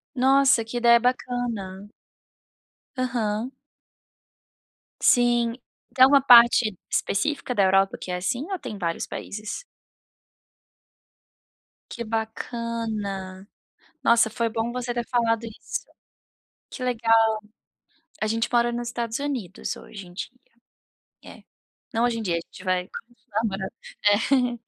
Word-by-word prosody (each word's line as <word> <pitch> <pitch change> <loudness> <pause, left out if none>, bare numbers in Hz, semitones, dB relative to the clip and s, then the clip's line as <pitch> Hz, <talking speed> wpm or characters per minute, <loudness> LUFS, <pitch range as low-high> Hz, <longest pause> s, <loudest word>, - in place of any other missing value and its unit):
Nossa, 265 -1 +4
que 235 +2 -5
ideia 235 0 +6
bacana. 235 -6 -2 1.1
Aham. 235 -2 -1 1.5
Sim, 240 -1 +4 0.4
tem 260 - +7
alguma 275 +1 +7
parte 235 -5 +7
específica 260 +2 -1
da 200 - +4
Europa 195 +1 +3
que 185 - -6
é 180 - -1
assim 245 - -2
ou 380 - -2
tem 250 -5 -6
em - - -7
vários 170 -2 -2
países? 215 - -6 2.3
Que 235 - -5
bacana. 220 -4 -4 0.6
Nossa, 230 -1 +4
foi 230 +1 -1
bom 225 +1 -2
você 245 -1 -3
ter 240 -1 -2
falado 230 -2 +1
isso. 230 - -6 0.8
Que 255 - -8
legal. 230 -2 +2 1.1
A 215 - +1
gente 225 +1 0
mora 240 0 +3
nos 240 0 -3
Estados 235 -1 -3
Unidos 255 -10 -4
hoje 195 -4 -11
em 175 - -15
dia. 185 - -5 0.9
É. - - -13 0.5
Não 230 - +1
hoje 240 -1 +1
em - - -4
dia, 180 -5 -1
a - - 0
gente 175 - -14
vai 185 -1 0
continuar 230 -3 -6
morando. 195 -1 -3 0.3
É. 240 +3 +2
230 Hz, 125 wpm, -25 LUFS, 210-245 Hz, 2.3 s, tem